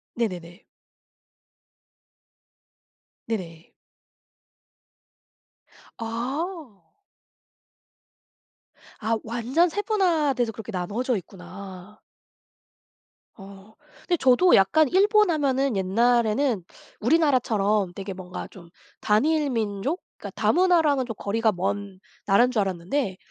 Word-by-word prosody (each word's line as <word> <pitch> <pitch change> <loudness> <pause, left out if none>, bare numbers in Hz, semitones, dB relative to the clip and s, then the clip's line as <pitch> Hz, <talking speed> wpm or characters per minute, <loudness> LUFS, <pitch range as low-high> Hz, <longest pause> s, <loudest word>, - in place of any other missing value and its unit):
네네네. 180 -5 -4 2.6
네네. 170 -7 -6 2.3
아. 245 - -5 2.1
아. 225 +1 0
완전 245 +10 +1
세분화돼서 325 - 0
그렇게 220 0 -9
나누어져 210 +7 -2
있구나. 190 +2 -11 1.4
어. 195 +2 -13 0.3
근데 350 - +2
저도 265 +8 +5
약간 300 +11 +4
일본 415 - +4
하면은 275 -5 +1
옛날에는 230 +3 +1 0.4
우리나라처럼 220 - +2
되게 195 +1 -6
뭔가 180 -1 -8
좀 170 -3 -14 0.3
단일민족 255 - 0 0.2
그러니까 - - -8
다문화랑은 325 -7 +3
좀 225 - -6
거리가 220 +2 0
먼 195 +1 -3 0.3
나라인 235 +6 +4
줄 240 - 0
알았는데 190 +3 -2
225 Hz, 200 characters per minute, -25 LUFS, 195-285 Hz, 2.6 s, 저도